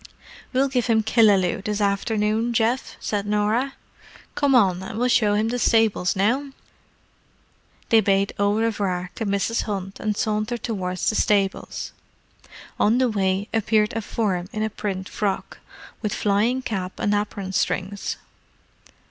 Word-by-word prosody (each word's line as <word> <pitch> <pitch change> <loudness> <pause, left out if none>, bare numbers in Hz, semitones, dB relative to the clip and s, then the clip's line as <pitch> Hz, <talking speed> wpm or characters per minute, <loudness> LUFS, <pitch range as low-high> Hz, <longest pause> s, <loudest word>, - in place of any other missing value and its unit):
"We'll 270 +2 +2
give 255 -3 0
him 220 -2 +3
Killaloe 205 -5 +3
this 210 0 -2
afternoon, 215 +3 0
Geoff," 235 +3 0
said 205 -1 -2
Norah. 215 +6 0 0.6
"Come 285 -2 +2
on, 190 -6 +4
and 190 +2 -6
we'll 250 +2 +1
show 210 -4 +3
him 215 +2 +1
the 245 +1 -2
stables 225 -6 +2
now." 255 +8 0 1.4
They 225 -1 +6
bade 195 0 +1
au 205 0 +2
revoir 200 -5 -1
to 225 - -4
Mrs. 200 +3 0
Hunt 195 -2 -4
and 210 -1 -2
sauntered 215 +2 -1
towards 185 -5 -2
the - - +3
stables. 200 -3 0 0.9
On 220 +3 +4
the 255 -1 +3
way 195 -1 0
appeared 215 -1 +2
a 225 - -2
form 190 -5 -2
in 215 - -2
a 220 - -1
print 195 -3 -4
frock, 200 -2 -3 0.4
with 210 -3 -2
flying 220 +6 +1
cap 190 -6 -3
and 205 - +1
apron 205 -2 -2
strings. 190 +2 -1
210 Hz, 145 wpm, -23 LUFS, 195-225 Hz, 1.4 s, They